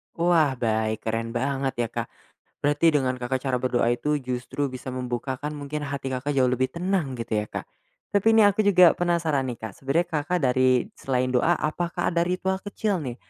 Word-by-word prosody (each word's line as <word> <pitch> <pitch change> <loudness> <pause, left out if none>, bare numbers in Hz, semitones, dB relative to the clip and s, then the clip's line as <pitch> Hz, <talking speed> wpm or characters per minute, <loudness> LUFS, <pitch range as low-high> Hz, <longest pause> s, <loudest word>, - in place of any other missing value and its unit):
Wah, 165 -5 +3
baik. 110 -2 -1
Keren 115 +1 -3
banget 135 +1 -1
ya, - - -2
Kak. - - -3 0.5
Berarti 145 +3 +3
dengan 130 -3 +1
Kakak 125 +1 -2
cara 130 -2 -1
berdoa 125 -2 +1
itu, 145 +4 0
justru 130 +3 -3
bisa 130 0 -7
membukakan 130 +4 -4
mungkin 145 +1 -5
hati 135 -2 -4
Kakak 140 +3 -2
jauh 130 -1 +4
lebih 130 +1 +1
tenang, 170 -4 -2
gitu 115 -2 -1
ya, 105 - -5
Kak. - - -5 0.5
Tapi 200 +1 0
ini 220 - +7
aku 205 +1 +4
juga 180 -4 +7
penasaran, 165 -6 0
nih, 120 - -4
Kak. 110 -3 -7
Sebenarnya 140 +6 +1
Kakak 180 +4 -1
dari 130 -1 +3
selain 130 -1 0
doa, 165 +8 +3
apakah 175 +3 -1
ada 170 - +1
ritual 190 +1 -1
kecil, 205 -2 -2
nih, 125 -4 -5
135 Hz, 185 wpm, -25 LUFS, 125-170 Hz, 0.5 s, ini